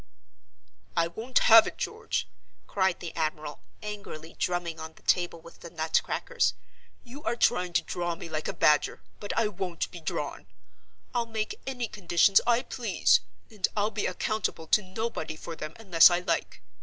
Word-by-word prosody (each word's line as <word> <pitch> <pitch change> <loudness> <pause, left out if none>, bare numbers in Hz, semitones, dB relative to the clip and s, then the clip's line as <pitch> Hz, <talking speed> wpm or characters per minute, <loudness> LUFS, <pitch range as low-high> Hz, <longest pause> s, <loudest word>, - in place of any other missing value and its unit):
"I 165 - +4
won't 230 +9 -2
have 225 -1 +9
it, - - -6
George!" - - -2 0.4
cried 190 -2 0
the 170 - -6
admiral, 155 -2 -3 0.2
angrily 200 -6 -7
drumming 175 -2 -1
on 160 0 -8
the - - -20
table 175 -2 +1
with 165 +1 -15
the 170 - -9
nutcrackers. 165 - 0 0.5
"You 260 +4 -11
are 235 - 0
trying 180 -6 +2
to - - +2
draw 175 -1 -3
me 165 - -8
like 155 -1 -3
a - - -2
badger, 150 -1 +3 0.2
but 205 - -4
I 225 -1 +3
won't 180 -4 -4
be 175 - -9
drawn! 145 -9 -4 0.7
I'll 235 -1 0
make 220 -1 -4
any 250 -3 -2
conditions 195 -1 +4
I 240 0 +3
please; - - +2 0.3
and 210 -3 0
I'll 210 +1 +1
be 215 - -1
accountable 185 -3 -2
to 215 - +5
nobody 185 -5 -4
for 165 +1 -7
them 155 0 -7
unless 185 -7 +7
I 175 0 +1
like. 170 - -2
180 Hz, 170 wpm, -28 LUFS, 165-215 Hz, 0.7 s, have